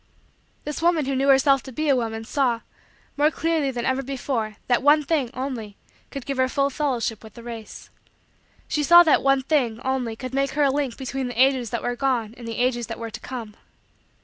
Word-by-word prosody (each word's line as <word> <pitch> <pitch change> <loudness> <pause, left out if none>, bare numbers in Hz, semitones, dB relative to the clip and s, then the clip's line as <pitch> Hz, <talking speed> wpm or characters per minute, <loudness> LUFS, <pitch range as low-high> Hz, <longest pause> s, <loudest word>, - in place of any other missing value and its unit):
This 300 +1 -5
woman 335 -3 +2
who 275 0 -1
knew 270 +1 +1
herself 275 0 +5
to 265 - -10
be 305 +5 -2
a 280 - +4
woman 225 -2 -3
saw, 245 -3 0 0.6
more 295 +1 +4
clearly 320 -3 0
than 245 -2 -3
ever 260 +1 +1
before, 250 -5 -3
that 245 -1 +2
one 295 +2 +5
thing, 290 -5 0
only, 240 -6 -5 0.3
could 275 -3 -7
give 275 -1 -3
her 260 0 +2
full 275 +1 +1
fellowship 245 -7 -2
with 220 -2 -13
the 235 - -11
race. 230 -2 -9 0.8
She 300 - -1
saw 345 +4 +8
that 315 - +4
one 275 -1 +2
thing, 255 -6 0
only, 255 -4 -1
could 255 +2 -7
make 275 +1 0
her 295 - +2
a 275 - +4
link 275 -3 -2
between 265 0 -3
the 245 -1 -6
ages 260 -3 +3
that 235 - -3
were 245 - -1
gone 240 -4 -1
and 240 -2 -10
the 230 - -5
ages 240 -1 0
that 225 - -6
were 230 -1 -6
to - - -7
come. 230 -5 -7
260 Hz, 215 wpm, -24 LUFS, 235-275 Hz, 0.8 s, saw